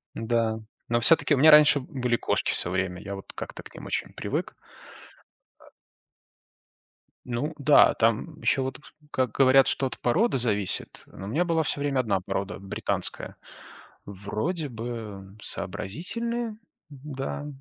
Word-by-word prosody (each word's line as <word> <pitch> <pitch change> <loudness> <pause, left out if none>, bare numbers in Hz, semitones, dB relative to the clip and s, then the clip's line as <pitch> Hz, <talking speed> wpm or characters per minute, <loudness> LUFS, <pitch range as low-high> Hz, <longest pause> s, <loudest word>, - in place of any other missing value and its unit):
Да. 115 -1 0 0.3
Но 120 0 +2
всё-таки 145 +2 +4
у - - +1
меня 155 +4 +8
раньше 150 -1 +8
б 130 - -11
были 125 -1 +2
кошки - - 0
всё 85 - -2
время. 90 -1 -2
Я 100 0 -6
вот 95 - -9
как-то - - -7
к - - -14
ним - - -9
очень - - -3
привык. - - -3 1.1
Э - - -18 1.6
Ну 125 +5 -2
да, 145 +1 +6
там 115 +8 0
ещё 135 - +2
вот, 130 0 -4 0.3
как 130 -6 0
говорят, 135 0 +6
что 135 - 0
от 130 - -5
породы 175 - +2
зависит, 105 -5 -2
но - - -11
у - - -5
меня 155 +10 +1
была 165 -2 +1
всё 150 -2 -2
время 140 -2 +1
одна 110 -6 0
порода, 95 +1 -3
британская. 100 -1 -4 0.7
Вроде 105 - -3
бы 110 -5 -7
сообразительная, 200 - -3 0.3
да. 140 0 -6
125 Hz, 145 wpm, -26 LUFS, 105-145 Hz, 1.6 s, меня